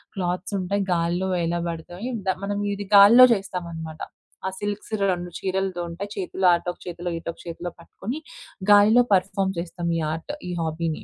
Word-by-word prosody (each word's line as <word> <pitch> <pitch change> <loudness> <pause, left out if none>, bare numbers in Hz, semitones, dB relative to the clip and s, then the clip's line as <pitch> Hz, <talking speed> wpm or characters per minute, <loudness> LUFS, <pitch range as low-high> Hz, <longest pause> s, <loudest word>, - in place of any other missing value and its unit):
Clothes 180 +1 -2
ఉంటాయి, 195 +2 -1
గాల్లో 175 +2 0
వేలబడతాయి. 170 +5 -3 0.2
The 190 - +2
మనం 205 +1 -2
ఇది 200 0 -5
గాలిలో 215 +6 +10
చేస్తామనమాట. 170 -5 -5 0.5
ఆ - - +1
సిల్క్స్ 205 +1 -4 0.2
2 175 0 -3
చీరలతో 190 -1 -1
ఉంటాయి. 190 +5 -6
చేతులో 190 0 0
అటు 170 - -6
ఒక - - -27
చేతిలో 175 0 -5
ఇటు 165 - -6
ఒక - - -25
చేతిలో 170 +1 -5
పట్టుకొని, 225 - -6 0.5
గాలిలో 215 +4 +7
పర్ఫార్మ్ 190 +1 +1
చేస్తాం, 170 0 -4
ఈ - - -1
ఆర్ట్, 165 - -6 0.2
ఈ - - -3
హాబీని. 160 0 -2
180 Hz, 160 wpm, -24 LUFS, 170-200 Hz, 0.5 s, గాలిలో